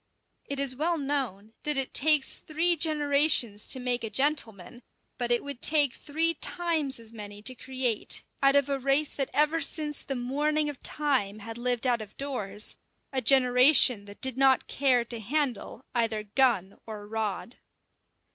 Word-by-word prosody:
It 280 -1 -4
is 275 -2 +3
well 330 +5 -1
known 260 -8 -4
that 300 -2 -1
it 270 -1 0
takes 300 -1 +3
three 335 +3 +1
generations 290 -8 +1
to 260 - +1
make 250 -1 -2
a 225 - -4
gentleman; 240 - -2 0.4
but 240 -1 -2
it 240 - +2
would 280 -3 -8
take 295 -4 +3
three 325 +3 -1
times 320 -5 -2
as 225 0 -13
many 205 -1 -10
to 255 - -1
create, 255 -3 -1 0.2
out 275 0 +4
of 280 -1 +3
a 275 -1 -2
race 275 +3 +1
that 275 -2 -3
ever 305 +2 +2
since 295 +1 0
the 270 - -5
morning 295 +5 -1
of 285 - -9
time 260 -9 +1
had 225 +2 -9
lived 245 0 -1
out 240 -3 +1
of 210 -1 -12
doors, 215 -7 -2 0.4
a 260 - 0
generation 250 -2 +5
that 200 0 -14
did 260 -1 0
not 265 -1 +3
care 255 -4 +1
to 235 0 -5
handle 255 0 -3
either 225 -3 -1
gun 210 -4 0
or 210 -2 -8
rod. 220 +2 -4
260 Hz, 165 wpm, -27 LUFS, 230-290 Hz, 0.4 s, generation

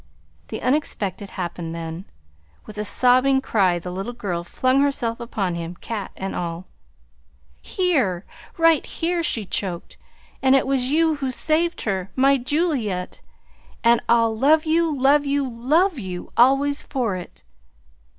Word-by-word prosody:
The - - -6
unexpected 220 -8 -1
happened 170 -2 -5
then. 165 +2 -6 0.6
With 210 0 -9
a - - -1
sobbing 255 +4 +4
cry 195 -9 +1
the 180 +1 -6
little 195 +6 -5
girl 180 -7 -3
flung 255 +9 +1
herself 245 -5 0
upon 210 -6 -2
him, 170 +1 -5
cat 210 +1 -5
and 195 0 -4
all. 170 +1 -4 1.0
"Here, 260 - 0 0.3
right 330 -3 +4
here," 345 +1 -2
she 230 -9 -2
choked. 180 -2 -4 0.4
"And 265 0 +5
it 270 - +3
was 265 -2 0
you 315 +2 +2
who 270 -2 -2
saved 325 +6 0
her 190 -3 -2
my 275 +1 +4
Juliette! 250 - -1 0.6
And 235 0 +4
I'll 230 -1 +3
love 305 +7 +3
you, 330 +2 +3
love 285 +1 +3
you, 280 -1 0
love 290 +8 +1
you 180 -4 -7
always 275 +4 +4
for 245 -11 -2
it!" 180 -1 -10
245 Hz, 140 wpm, -22 LUFS, 190-285 Hz, 1.0 s, And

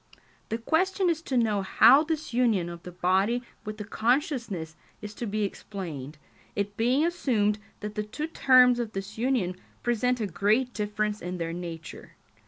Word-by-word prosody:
The 225 - -1
question 360 - +1
is 325 -1 -3
to 265 -5 -2
know 215 -4 +2
how 270 +9 +6
this 315 -5 -3
union 225 -8 +2
of 170 -1 -8
the 180 - -9
body 190 +7 +1 0.2
with 215 0 -6
the 210 - -5
consciousness 225 - -1 0.2
is 210 -1 -8
to 235 +2 -5
be 210 +1 -1
explained, 165 -9 -6 0.4
it 205 0 -2
being 250 +8 +2
assumed 225 -12 +1 0.2
that 210 0 -5
the 210 - -2
two 210 +9 -4
terms 255 -6 +5
of 230 -2 -3
this 195 +3 -6
union 230 -8 0 0.3
present 245 +1 +1
a 220 - 0
great 215 +7 +1
difference 210 0 -2
in 180 +1 -4
their 165 -1 -3
nature. 170 -2 -8
215 Hz, 170 wpm, -27 LUFS, 195-250 Hz, 0.4 s, how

